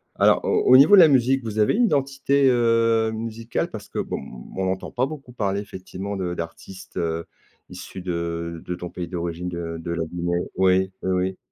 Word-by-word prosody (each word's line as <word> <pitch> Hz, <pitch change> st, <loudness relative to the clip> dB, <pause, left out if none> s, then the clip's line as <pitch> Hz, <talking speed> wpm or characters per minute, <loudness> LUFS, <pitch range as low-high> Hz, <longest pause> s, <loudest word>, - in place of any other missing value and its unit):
Alors, -, -, +4 dB
au -, -, +2 dB
au 130 Hz, -, +8 dB
niveau 175 Hz, +10 st, +8 dB
de 185 Hz, -, +9 dB
la 165 Hz, -, +9 dB
musique, 130 Hz, 0 st, +3 dB
vous 110 Hz, -1 st, -4 dB
avez 105 Hz, -, +4 dB
une 240 Hz, +2 st, +4 dB
identité, 140 Hz, -3 st, +2 dB
heu, 115 Hz, -2 st, +3 dB
musicale? 115 Hz, +1 st, -3 dB
Parce -, -, -9 dB
que, -, -, -4 dB
bon, -, -, -3 dB, 0.3 s
on 95 Hz, 0 st, -1 dB
n'entend 95 Hz, 0 st, -3 dB
pas 125 Hz, +2 st, +1 dB
beaucoup 140 Hz, -4 st, -9 dB
parler, 100 Hz, -3 st, -1 dB
effectivement, 100 Hz, 0 st, -6 dB
de 90 Hz, -2 st, -3 dB
d'artistes, 90 Hz, +3 st, -8 dB
heu, 85 Hz, -1 st, -2 dB, 0.4 s
issus 95 Hz, -, -9 dB
de 85 Hz, -1 st, -4 dB
de 90 Hz, -, -3 dB
ton 90 Hz, 0 st, -7 dB
pays 90 Hz, -1 st, -6 dB
d'origine, 85 Hz, 0 st, -4 dB
de 85 Hz, -1 st, -5 dB
de 85 Hz, +1 st, -5 dB
la 85 Hz, -1 st, -1 dB
Guinée. 85 Hz, +1 st, -2 dB, 0.2 s
Oui, 95 Hz, 0 st, +3 dB
oui, 95 Hz, -, -1 dB
oui. 95 Hz, +1 st, 0 dB
95 Hz, 200 wpm, -23 LUFS, 85-120 Hz, 0.4 s, de